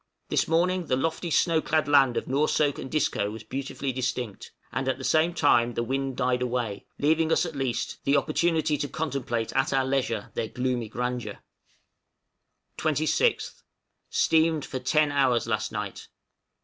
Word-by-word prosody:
This - - +1
morning 175 +1 +1
the 130 - +2
lofty 165 +5 -2
snow 165 0 +3
clad 155 -1 +1
land 135 -4 +4
of - - -1
Noursoak 145 +1 +1
and - - -6
Disco 150 -9 0
was 110 +1 -8
beautifully 135 +3 -4
distinct; 125 -4 -4 0.2
and 135 +2 -2
at 130 - 0
the 130 - -9
same 160 +5 +3
time 120 -8 +3
the 120 - 0
wind 135 +1 -2
died 125 -1 +1
away, 120 -5 -2
leaving 160 +2 +2
us, 170 - +3
at 165 -3 -6
least, 125 -3 -3
the 140 +1 +3
opportunity 155 0 +1
to 145 - -1
contemplate 130 -7 -2
at 135 - +1
our 135 -1 +2
leisure 130 -6 -1
their 110 - -2
gloomy 125 -2 -2
grandeur. 125 -2 -3 1.4
{CAPTAIN 155 -2 0
YOUNG'S 155 - +1
JOURNEY.} 485 - +6
26th. - - -10 0.5
Steamed 160 -2 +2
for 130 - -5
ten 150 +3 +2
hours 130 -5 +2
last - - -1
night. - - -5
135 Hz, 170 wpm, -26 LUFS, 125-155 Hz, 1.4 s, JOURNEY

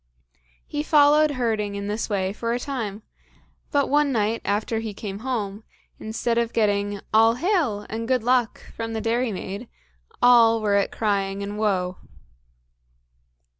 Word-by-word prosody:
He 295 - -3
followed 300 0 +4
herding 215 -4 -1
in 200 0 -4
this 210 +3 -3
way 195 -2 -1
for 230 +2 -2
a 245 - -1
time; 225 -7 -4 0.7
but 285 -2 +2
one 290 0 +2
night 225 -1 0
after 215 +2 -1
he 220 -2 -5
came 200 -1 -6
home, 215 -4 -3 0.4
instead 230 +2 -1
of 230 -1 -1
getting 205 -2 0
"All 225 +1 +5
hail" 290 - 0
and 225 +1 -4
"good 255 -2 +1
luck" 245 -1 +1
from 225 0 -5
the 220 - -2
dairymaid, 225 -2 -2 0.5
all 230 -2 +6
were 210 -2 0
at 200 0 +2
crying 200 -2 -1
and 205 +1 -5
woe. 190 -4 0
225 Hz, 145 wpm, -24 LUFS, 205-245 Hz, 0.7 s, all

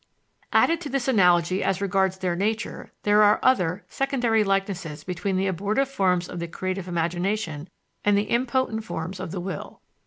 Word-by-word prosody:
Added 335 0 +3
to 295 - -5
this 270 -1 -1
analogy 180 -5 +3
as 195 -1 0
regards 190 -1 +1
their 180 -2 -1
nature, 215 +4 -2
there 210 0 +4
are 210 0 +5
other, 185 -7 +2
secondary 245 -5 +1
likenesses 195 -6 -2
between 185 +1 -2
the 190 - +1
abortive 205 +8 0
forms 180 -8 +1
of 175 - -6
the 170 - -3
creative 185 +2 -4
imagination 175 -1 -2 0.3
and 205 -1 +4
the 205 - +2
impotent 240 -1 0
forms 185 -2 -5
of 185 - -5
the 180 - -4
will. 180 -3 -6
195 Hz, 165 wpm, -25 LUFS, 180-220 Hz, 0.3 s, are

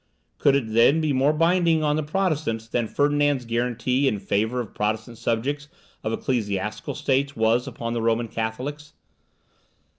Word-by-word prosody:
Could 140 - +4
it 115 -6 -1
then 120 +7 +5
be 155 -2 +1
more 135 +3 +3
binding 165 0 +2
on 150 0 +2
the 155 - 0
Protestants 150 - -1
than 120 0 -1
Ferdinand's 145 -1 +1
guarantee 125 +3 0
in 105 - +1
favour 110 +5 -1
of 115 -4 -5
Protestant 110 +2 -2
subjects 130 +6 -1 0.4
of 110 - -1
ecclesiastical 105 -4 -2
states 140 -1 0
was 115 +3 +2
upon 115 -3 -4
the 120 - -1
Roman 115 +1 +1
Catholics? 125 +7 -4
125 Hz, 150 wpm, -24 LUFS, 115-145 Hz, 0.4 s, then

